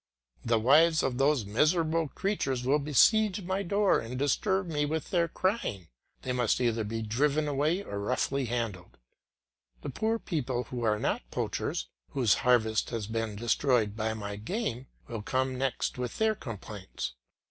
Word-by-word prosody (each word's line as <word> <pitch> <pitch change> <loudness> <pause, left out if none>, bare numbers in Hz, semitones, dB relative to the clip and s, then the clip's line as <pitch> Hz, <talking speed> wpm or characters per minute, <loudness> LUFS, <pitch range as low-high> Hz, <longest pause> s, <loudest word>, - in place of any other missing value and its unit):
The 115 -1 +2
wives 155 +8 +5
of 125 -1 -1
those 135 -4 +3
miserable 160 - +2
creatures 140 -8 -2
will 140 +4 +3
besiege 195 - +3
my 190 +2 -1
door 200 +1 +2
and 120 +2 -6
disturb 190 +8 +1
me 150 -4 -1
with 155 +4 -2
their 170 -3 +2
crying; 165 - -2 0.3
they 130 - -2
must 125 -3 +1
either 115 -2 +1
be 110 +2 -3
driven 145 +7 +1
away 150 +7 +1
or 100 - -5
roughly 130 +5 0
handled. 115 -7 -4 0.9
The - - -4
poor 220 - 0
people 130 - -2
who 125 0 -6
are 110 -2 +2
not - - -2
poachers, - - -2 0.3
whose 125 -7 +3
harvest 110 -3 +2
has 115 -3 -3
been 110 0 -3
destroyed 115 -1 +1
by 110 0 -1
my 100 -1 -5
game, 130 - -3 0.2
will 115 -3 -5
come 130 +4 -1
next 130 -1 -2
with 125 -1 -4
their 220 0 +3
complaints. 105 - -7
130 Hz, 160 wpm, -29 LUFS, 115-160 Hz, 0.9 s, wives